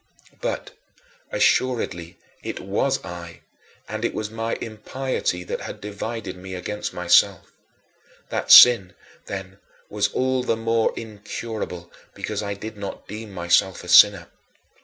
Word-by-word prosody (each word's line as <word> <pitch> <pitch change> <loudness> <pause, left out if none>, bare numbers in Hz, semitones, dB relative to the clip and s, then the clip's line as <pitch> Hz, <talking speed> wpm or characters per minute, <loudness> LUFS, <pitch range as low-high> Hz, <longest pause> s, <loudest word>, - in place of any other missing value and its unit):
But, - - -3 0.6
assuredly, 120 - 0 0.2
it - - -5
was 105 +8 -1
I, 85 -1 -9 0.5
and 110 +2 -5
it 120 - -1
was 105 0 -4
my 115 0 -2
impiety 110 -4 -3
that - - -5
had - - -7
divided 105 -1 -5
me 95 +1 -8
against 105 +4 -4
myself. - - +3 0.8
That - - -1
sin 115 -7 +9 0.3
then 95 0 -7 0.3
was 105 -1 +1
all 130 0 0
the 115 -2 0
more 115 0 +1
incurable 105 -4 -6 0.2
because - - -4
I 100 -1 -4
did 110 +2 -8
not 100 -1 -7
deem 105 +1 -8
myself 90 +1 +1
a - - -10
sinner. 100 0 +6
105 Hz, 130 wpm, -23 LUFS, 95-115 Hz, 0.8 s, sin